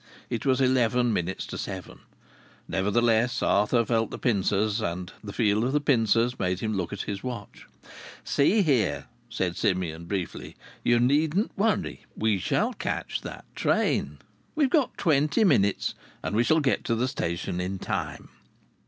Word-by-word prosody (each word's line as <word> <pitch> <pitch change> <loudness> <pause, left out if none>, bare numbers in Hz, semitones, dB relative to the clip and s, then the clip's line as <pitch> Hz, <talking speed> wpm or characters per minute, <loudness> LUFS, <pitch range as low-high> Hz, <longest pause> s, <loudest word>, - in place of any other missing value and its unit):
It - - -2
was 130 -1 +3
eleven 125 -2 +3
minutes 90 0 -2
to - - -6
seven. - - -6 0.7
Nevertheless, 115 +4 +1
Arthur 115 +4 +3
felt 115 -2 +1
the - - -6
pincers, 105 -1 +1
and 90 -1 -4
the 100 - -6
feel 105 0 +2
of 130 +3 0
the 150 - +3
pincers 120 -3 +2
made 90 0 0
him 110 0 -2
look 90 -4 -2
at 100 - -4
his 100 -1 -4
watch. 120 -5 -7 0.6
"See 200 +9 +3
here," 130 - +1 0.2
said 90 -2 -2
Simeon, 90 -5 -1
briefly. 95 -1 -4 0.3
"You 120 0 +4
needn't 150 - +2
worry. 205 -1 0
We 110 -2 +1
shall - - 0
catch - - -3
that - - -8
train. 75 +1 0 0.4
We've 290 -3 +2
got 295 -6 +2
twenty 150 +4 +2
minutes, 110 - +2 0.3
and 95 - -2
we 115 - +4
shall 160 +5 +3
get 135 -3 +1
to 115 - +1
the 120 +3 0
station 85 -5 -3
in 95 +1 -3
nine." - - -3
115 Hz, 155 wpm, -26 LUFS, 95-130 Hz, 0.7 s, You